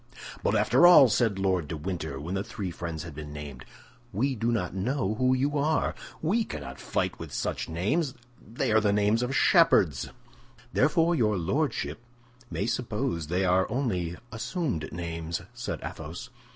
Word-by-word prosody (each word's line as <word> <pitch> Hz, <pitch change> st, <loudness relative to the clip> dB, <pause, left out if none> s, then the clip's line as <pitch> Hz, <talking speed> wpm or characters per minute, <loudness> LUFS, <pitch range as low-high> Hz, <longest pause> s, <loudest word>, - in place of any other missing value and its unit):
"But -, -, +1 dB
after 130 Hz, +9 st, +5 dB
all," 155 Hz, -8 st, +9 dB
said 110 Hz, -3 st, +2 dB
Lord 95 Hz, -5 st, 0 dB
de 80 Hz, -, -4 dB
Winter, 80 Hz, -4 st, -4 dB
when 80 Hz, +6 st, -5 dB
the 95 Hz, 0 st, -1 dB
three 95 Hz, -3 st, -5 dB
friends 85 Hz, -2 st, -5 dB
had 85 Hz, -2 st, -8 dB
been 75 Hz, 0 st, -8 dB
named, 75 Hz, -4 st, -8 dB, 0.5 s
"we 130 Hz, +7 st, 0 dB
do 115 Hz, 0 st, 0 dB
not 105 Hz, -7 st, -1 dB
know 105 Hz, +2 st, -1 dB
who 130 Hz, +3 st, +2 dB
you 140 Hz, +3 st, 0 dB
are. 155 Hz, +3 st, +1 dB, 0.3 s
We 210 Hz, +9 st, +2 dB
cannot 65 Hz, -, -7 dB
fight -, -, -2 dB
with -, -, -7 dB
such -, -, -3 dB
names; 115 Hz, -, 0 dB, 0.3 s
they 110 Hz, +1 st, -2 dB
are 110 Hz, 0 st, +5 dB
names 105 Hz, +2 st, +2 dB
of 125 Hz, +2 st, -1 dB
shepherds." 95 Hz, -, +4 dB, 0.6 s
"Therefore 165 Hz, +4 st, +3 dB
your 110 Hz, -, +2 dB
lordship 135 Hz, -, -1 dB, 0.5 s
may 100 Hz, -, -2 dB
suppose 115 Hz, -, -2 dB
they 90 Hz, +4 st, 0 dB
are 90 Hz, +1 st, +3 dB
only 100 Hz, -9 st, -1 dB, 0.2 s
assumed 115 Hz, -, -3 dB
names," 85 Hz, 0 st, -4 dB
said 120 Hz, 0 st, -4 dB
Athos. -, -, -7 dB
105 Hz, 160 wpm, -28 LUFS, 85-130 Hz, 0.6 s, all